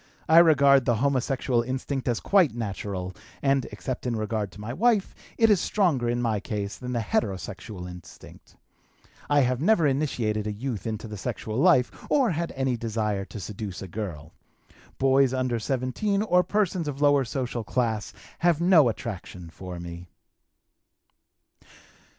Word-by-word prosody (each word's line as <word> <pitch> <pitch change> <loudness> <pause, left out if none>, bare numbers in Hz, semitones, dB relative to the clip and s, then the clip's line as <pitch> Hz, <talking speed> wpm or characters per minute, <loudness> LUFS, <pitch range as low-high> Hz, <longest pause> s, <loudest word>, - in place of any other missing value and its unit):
I 160 +1 +8
regard 140 -5 +6
the 120 - +2
homosexual 130 -1 +1
instinct 130 +2 -3
as 120 -3 +1
quite 185 - +3
natural, 100 -4 -4 0.3
and, 135 -2 +2
except 130 -1 -5
in 120 - -1
regard 110 -2 -2
to - - -13
my 110 +3 -5
wife, 220 - +2 0.2
it 225 -1 +5
is 195 -4 +4
stronger 155 - +1
in 120 0 0
my 110 -3 +1
case 100 -1 -4
than 125 0 -6
the 120 - 0
heterosexual 95 -2 -3
instinct. 90 -1 -13 0.7
I 145 0 +4
have 125 0 0
never 175 -1 +4
initiated 120 -7 0
a - - -1
youth 115 0 -4
into 110 0 -4
the 105 -1 -7
sexual 110 +3 -4
life 150 -7 +4 0.2
or 265 -7 +3
had 170 +1 -2
any 130 -2 0
desire 105 -3 -2
to 105 - -9
seduce 100 0 -6
a - - -7
girl. 85 -6 -6 0.6
Boys 135 -1 +3
under 130 -2 0
17, 135 - -1
or 180 -4 +4
persons 185 -4 0
of 140 -1 -4
lower 145 -1 +4
social 120 -2 -3
class, 110 -2 -1 0.3
have 170 -3 +3
no 170 -7 +5
attraction 90 -7 -7
for 90 0 -8
me." 85 +1 -8
125 Hz, 155 wpm, -26 LUFS, 105-145 Hz, 0.7 s, I